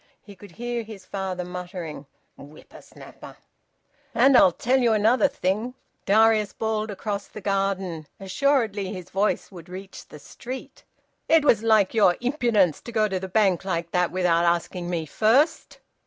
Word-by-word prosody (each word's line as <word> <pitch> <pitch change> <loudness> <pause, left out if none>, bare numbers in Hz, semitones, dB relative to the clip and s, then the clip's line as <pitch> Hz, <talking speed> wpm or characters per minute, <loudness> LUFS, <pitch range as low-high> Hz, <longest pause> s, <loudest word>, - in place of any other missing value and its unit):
He 205 -2 -13
could 195 -2 -15
hear 240 +2 -4
his 210 -4 -11
father 185 -2 -4
muttering 175 -5 -7 0.3
"Whipper 145 +2 -14
snapper!" - - -14 0.8
"And 275 0 +5
I'll 190 - +7
tell 255 +9 +1
you 235 -3 +3
another 225 +6 +3
thing," 215 +4 -2 0.3
Darius 215 0 +3
bawled 220 -1 -2
across 200 0 -4
the - - -10
garden 195 -5 -2
assuredly 215 -2 0
his 185 -4 -9
voice 200 +2 -1
would 175 -2 -12
reach 190 +2 -10
the - - -12
street. 255 - -9 0.5
"It 320 -2 +4
was 220 -7 +4
like 220 -4 +3
your 205 -6 +4
impudence 235 - +1
to 235 - -9
go 215 -2 +2
to 190 -2 -2
the 190 - -6
Bank 190 -2 +2
like 170 -3 -3
that 180 -1 +1
without 175 -2 +1
asking 175 +1 -1
me 170 -3 -2
first! 225 - +1
200 Hz, 155 wpm, -24 LUFS, 180-225 Hz, 0.8 s, I'll